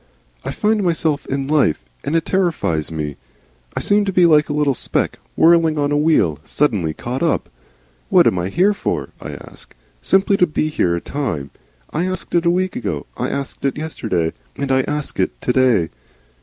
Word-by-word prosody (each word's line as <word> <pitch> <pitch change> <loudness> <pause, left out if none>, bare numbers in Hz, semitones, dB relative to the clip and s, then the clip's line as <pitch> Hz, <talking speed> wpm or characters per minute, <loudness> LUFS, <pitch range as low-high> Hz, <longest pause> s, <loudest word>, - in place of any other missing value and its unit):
"I - - -4
find 215 0 +1
myself 160 -4 0
in 135 0 -2
life, 145 - +3 0.3
and 155 - -1
it 165 - +1
terrifies 160 - 0
me. 75 -3 -4 0.6
I - - 0
seem 205 0 +3
to 195 - 0
be 180 -1 +4
like 150 -2 +4
a - - -1
little 145 -1 +2
speck, - - -1 0.2
whirling 165 -1 +4
on 145 0 +1
a - - +2
wheel, 145 - +2
suddenly 100 - 0
caught 125 +2 -4
up. 165 -2 0 0.6
'What - - +6
am 90 - +2
I 90 +2 -2
here 190 - +3
for?' - - -3
I - - -6
ask. - - -10 0.3
Simply 195 +1 +3
to 180 - +4
be 155 0 -1
here 90 - +1
at 85 - -6
a - - -9
time 90 - -3 0.4
I 170 +4 -1
asked 185 0 -4
it 170 0 +2
a - - +6
week 185 +1 0
ago, 95 -11 -3
I - - -2
asked 140 -1 -5
it 140 0 0
yesterday, 110 - -2 0.2
and 140 -1 -2
I 130 0 +4
ask 150 -1 -3
it - - 0
to 125 - 0
day. 120 -10 +3
150 Hz, 195 wpm, -19 LUFS, 110-170 Hz, 0.6 s, What